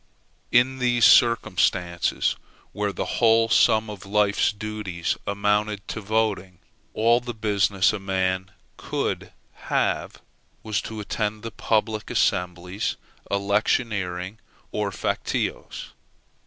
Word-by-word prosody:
In 130 +2 +3
these 120 -2 +3
circumstances, 95 -7 +3 0.4
where 105 -1 -2
the - - -3
whole 115 -1 +3
sum 110 0 +4
of 105 -3 -8
life's 100 0 +2
duties 105 -5 -3
amounted 105 0 0
to 110 - -4
voting, 100 -4 -1 0.4
all 115 +2 +4
the 120 -1 -7
business 100 -2 +2
a 110 - -3
man 95 -1 -1 0.3
could - - -3 0.4
have - - 0 0.4
was 110 -2 -1
to 110 -1 -6
attend 105 +1 -3
the 115 - -5
public 110 -1 -1
assemblies, 90 +2 -1 0.3
electioneering, 100 -1 -1 0.3
or 105 -1 -2
factious. - - -3
105 Hz, 105 wpm, -24 LUFS, 95-110 Hz, 0.4 s, sum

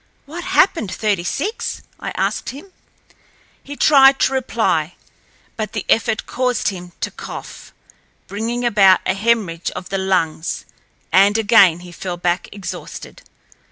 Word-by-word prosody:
"What 330 +5 -7
happened, 375 - +2
Thirty 205 -5 -1
six?" 385 - -3 0.2
I - - -5
asked - - -1
him. 330 +9 -11 0.9
He 285 - -8
tried 275 -2 +6
to 270 - +2
reply, 195 -11 0 0.6
but 215 -1 -4
the 215 - -4
effort 220 -1 +1
caused 250 -3 0
him 180 -3 -9
to - - -2
cough, - - -9 0.5
bringing 230 +4 -3
about 195 -5 +5
a - - +1
hemorrhage 195 -5 0
of 180 - -7
the 195 - -1
lungs 175 -4 -1 0.5
and 200 +3 +5
again 200 -6 +5
he 180 0 -11
fell 175 0 -5
back 175 +1 -1
exhausted. 200 -1 -8
210 Hz, 135 wpm, -19 LUFS, 180-250 Hz, 0.9 s, tried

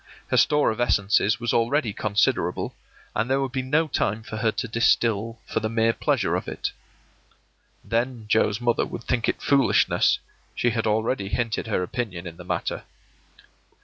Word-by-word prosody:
Her - - +2
store 150 -4 +4
of 110 +2 -4
essences 105 0 +2
was 120 -1 -1
already 120 0 +1
considerable, 105 -1 0 0.4
and 110 +3 0
there 135 +1 +2
would 135 -2 -2
be 130 - -1
no 150 +5 +1
time 110 -5 -1
for 110 - -7
her 110 0 +1
to 125 - -3
distil 115 0 +1
for - - -2
the 110 0 -2
mere 115 0 +2
pleasure - - 0
of - - -3
it. - - -3 1.1
Then 115 0 -2
Joe's 105 0 +2
mother 120 -1 +1
would 115 - -7
think 120 -2 0
it - - -3
foolishness; 140 -1 +3 0.4
she 120 - +1
had 115 -1 -1
already 110 -1 0
hinted 115 0 -1
her 105 -4 0
opinion 95 -4 -4
in 85 -1 -8
the 90 - -10
matter. 90 - -3
115 Hz, 170 wpm, -24 LUFS, 110-120 Hz, 1.1 s, store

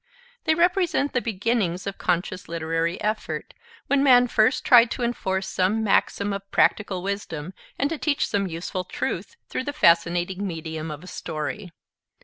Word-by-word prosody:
They 315 -1 +3
represent 350 -4 +2
the 250 - +1
beginnings 205 -5 -1
of 200 -1 -5
conscious 180 +1 -1
literary 165 +1 -2
effort, 215 +1 -3 0.3
when 280 -1 +2
man 250 -3 +6
first 220 +2 +2
tried 240 -3 +7
to 245 - -3
enforce 190 -5 -1
some 195 +5 +1
maxim 200 -1 +1
of 195 0 -6
practical 195 -4 +2
wisdom 190 -4 -4 0.2
and 280 - +1
to 320 - -3
teach 295 -3 +1
some 200 -1 -1
useful 175 +2 -4
truth - - -4
through 260 - -3
the 290 - -3
fascinating 175 +1 +2
medium 160 -2 -5
of 150 +1 -7
a - - -11
story. 160 +2 -5
195 Hz, 155 wpm, -24 LUFS, 170-240 Hz, 0.3 s, tried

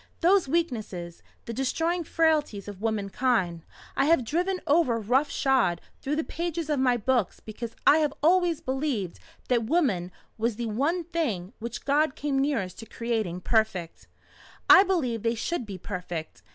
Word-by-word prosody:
Those 365 -1 +4
weaknesses 220 - -2 0.2
the 230 - -5
destroying 330 +8 0
frailties 305 - +1
of 205 -1 -8
womankind 205 -4 0 0.3
I 275 - +2
have 305 -5 +3
driven 360 - 0
over 285 -6 +3
rough 250 +7 +1
shod 260 -11 +2 0.2
through 285 +2 -1
the 315 - 0
pages 335 -1 -3
of 290 - +1
my 250 -2 +3
books 240 -2 0
because 225 +1 -7
I 310 - +7
have 300 -2 +1
always 345 -1 +3
believed 260 - -2 0.3
that 240 -3 +2
Woman 220 - +1 0.3
was 230 0 0
the 235 +2 -3
one 285 +11 0
thing 255 - -2
which 235 0 -6
God 290 0 +2
came 280 -2 -1
nearest 265 -10 -1
to 225 - -9
creating 220 -7 -2
perfect. 195 -6 -1 0.6
I 385 0 +10
believe 310 - 0
they 230 +1 0
should 245 +1 -3
be 195 -2 -6
perfect. 175 -3 -6
255 Hz, 155 wpm, -27 LUFS, 215-315 Hz, 0.6 s, I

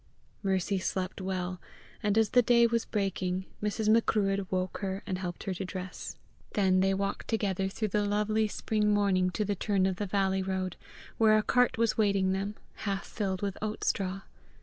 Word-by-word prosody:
Mercy 190 0 0
slept 185 +1 -3
well, 185 -1 -3 0.4
and 210 -1 +1
as 220 -2 +4
the 245 - +6
day 235 0 +5
was 230 0 +1
breaking 190 -2 -1 0.2
Mrs. 210 +1 -1
Macruadh 200 -3 +3
woke 185 -1 -2
her 195 -1 -3
and 185 -3 -3
helped 175 -2 -5
her 195 - -2
to 185 - -4
dress. 185 -1 -6 0.4
Then 190 -2 +3
they 195 +1 +3
walked 200 +1 -2
together 195 -4 0
through 215 +2 -2
the 210 +1 +1
lovely 210 +1 +1
spring 210 0 0
morning 190 -3 +3
to 210 +3 -1
the 205 - 0
turn 195 0 +1
of 190 -1 0
the 205 - -2
valley 190 0 +1
road, 190 -1 -2 0.4
where 215 -1 +6
a 215 - +2
cart 250 +1 +3
was 230 -1 +1
waiting 200 -3 +3
them, 195 +2 -2 0.2
half 195 -2 -2
filled 190 -2 -3
with 200 -1 -2
oat 215 0 -3
straw. 195 -1 0
195 Hz, 185 wpm, -30 LUFS, 190-210 Hz, 0.4 s, the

